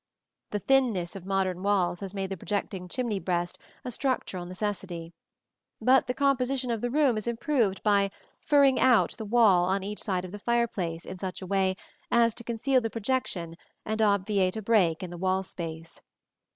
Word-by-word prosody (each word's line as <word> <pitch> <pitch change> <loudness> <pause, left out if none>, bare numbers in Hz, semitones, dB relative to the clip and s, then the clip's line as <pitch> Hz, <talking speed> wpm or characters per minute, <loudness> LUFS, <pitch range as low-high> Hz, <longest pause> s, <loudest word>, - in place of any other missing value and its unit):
The 210 - -1
thinness 215 -7 +1
of 190 -1 -9
modern 190 -2 0
walls 190 -3 +1
has 195 0 -7
made 195 -1 -3
the - - -1
projecting 190 -1 -3
chimney 225 0 -2
breast 175 -2 -2 0.3
a 250 - -3
structural 225 -9 -2
necessity; 180 -3 -4 0.7
but 260 +1 +4
the 250 - -2
composition 265 -2 +1
of 225 -2 -2
the 245 - -1
room 265 -4 +3
is 215 - -6
improved 235 -4 0
by 200 -2 +3 0.3
"furring 280 -3 +4
out" 250 -3 +4
the 220 - -5
wall 205 -5 +5
on 190 +1 0
each 210 +1 -5
side 185 -3 -1
of 180 - -9
the 205 - -7
fireplace 200 -8 -1
in 185 - -8
such 185 -1 -4
a 190 - -7
way 190 0 +1 0.3
as 235 -1 +4
to 235 - -8
conceal 245 +3 +1
the 225 - -2
projection 210 -8 -2 0.3
and 220 +1 -1
obviate 200 -2 +2
a - - -3
break 190 -7 +2
in 180 - -6
the 175 - -8
wall 190 +1 +1
space. 165 -3 -7
200 Hz, 180 wpm, -28 LUFS, 185-235 Hz, 0.7 s, wall